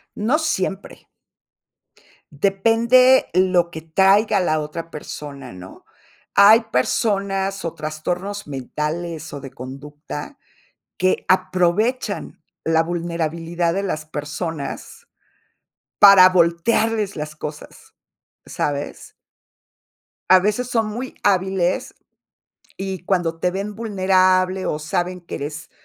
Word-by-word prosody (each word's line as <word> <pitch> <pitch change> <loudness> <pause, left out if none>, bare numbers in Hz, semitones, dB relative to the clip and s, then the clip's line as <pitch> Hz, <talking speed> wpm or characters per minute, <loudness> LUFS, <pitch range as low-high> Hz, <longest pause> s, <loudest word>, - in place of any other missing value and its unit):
No 240 +9 +1
siempre. 195 - -3 1.2
Depende 230 - +4
lo 180 -1 +3
que 160 - -7
traiga 195 +6 +3
la 155 -4 +1
otra 155 +2 -6
persona, 140 -4 -8
¿no? 90 +1 -12 0.5
Hay 210 +3 +7
personas 195 - 0
o 165 - -3
trastornos 175 +6 -4
mentales 155 +4 -4
o 145 - -5
de 135 -1 -10
conducta 145 - -9 0.6
que 185 0 +1
aprovechan 185 +2 0 0.2
la 160 0 +3
vulnerabilidad 170 0 -2
de 195 +2 -2
las 155 -5 -3
personas 150 0 -6 0.9
para 195 -2 +9
voltearles 195 +4 +1
las 150 0 -6
cosas, 150 0 -9 0.5
¿sabes? 145 0 -4 1.2
A 185 - +8
veces 210 +6 -1
son 230 -3 0
muy 240 +5 -6
hábiles 190 -2 +1 0.8
y 190 -2 -5
cuando 175 -3 0
te 180 +2 0
ven 200 +3 -4
vulnerable 185 -3 +2
o 150 - -1
saben 180 +3 -2
que 170 - -7
eres, 150 +2 -7
180 Hz, 100 wpm, -21 LUFS, 155-200 Hz, 1.2 s, para